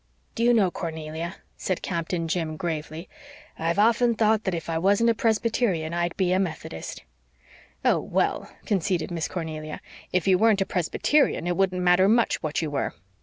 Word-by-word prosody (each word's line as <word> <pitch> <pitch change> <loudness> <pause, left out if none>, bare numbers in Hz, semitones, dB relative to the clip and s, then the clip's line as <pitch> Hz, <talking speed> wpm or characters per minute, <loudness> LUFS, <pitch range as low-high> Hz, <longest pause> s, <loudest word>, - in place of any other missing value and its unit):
"Do - - -4
you 240 - +5
know, 205 -6 +3
Cornelia," 160 +1 -5 0.2
said 185 - -2
Captain 170 -1 -2
Jim 160 -2 -2
gravely, 160 0 -4 0.5
"I've 165 +2 0
often 235 +2 +4
thought 220 -1 +2
that 190 -3 0
if 165 -2 -5
I 165 -1 -1
wasn't 205 +6 +3
a - - +1
Presbyterian 220 -7 0
I'd 175 0 -1
be 185 -2 +2
a 185 - +2
Methodist." 160 - -5 0.8
"Oh, - - +4
well," - - -1
conceded 185 -4 0
Miss 165 -2 -2
Cornelia, 155 -3 -5 0.3
"if 180 +1 0
you 185 -1 +4
weren't 220 -1 +4
a - - +2
Presbyterian 190 - +1
it 175 0 0
wouldn't 185 -1 +1
matter 180 +2 +5
much 235 +1 +2
what 155 +1 -2
you 155 - -3
were. 140 - -2
180 Hz, 170 wpm, -25 LUFS, 165-205 Hz, 0.8 s, you